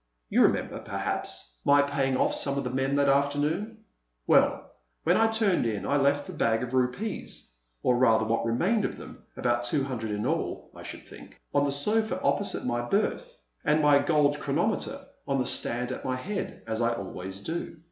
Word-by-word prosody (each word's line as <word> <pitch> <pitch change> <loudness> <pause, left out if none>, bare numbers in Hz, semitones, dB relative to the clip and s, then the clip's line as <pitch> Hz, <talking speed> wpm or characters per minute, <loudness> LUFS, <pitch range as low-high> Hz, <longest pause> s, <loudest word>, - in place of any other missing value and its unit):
You - - +4
remember, - - +2
perhaps, - - -4
my 145 0 +5
paying 135 -2 0
off - - +2
some 140 -1 0
of 140 - -1
the 125 - -3
men 135 +2 0
that 140 0 +3
afternoon? 145 +11 0 0.4
Well, - - +3 0.3
when - - +3
I 225 - +4
turned 220 - +2
in 105 -3 -3
I 145 - +2
left 140 +1 +2
the 185 - -8
bag 115 -6 +1
of 125 +1 -5
rupees 130 - -2 0.3
or 125 - +3
rather 115 -3 +4
what 115 +1 0
remained 175 - +1
of - - -2
them, - - -11 0.2
about 120 -1 +1
two 135 +3 +1
hundred 120 -5 -4
in 105 0 -2
all, - - -2
I - - -10
should - - -9
think - - -14
on 145 0 +3
the 140 - 0
sofa 215 +10 +1
opposite 200 - 0
my 120 -1 0
berth, 215 - -1 0.2
and 150 +1 +3
my 145 -1 +6
gold 145 0 +2
chronometer 205 - -1 0.3
on 140 -1 +1
the 130 - 0
stand 120 +1 0
at - - -5
my 130 - -1
head, 195 +10 -5
as 110 0 -2
I 115 0 +2
always 95 -1 -6
do. 165 +6 -4
140 Hz, 190 wpm, -28 LUFS, 120-160 Hz, 0.4 s, my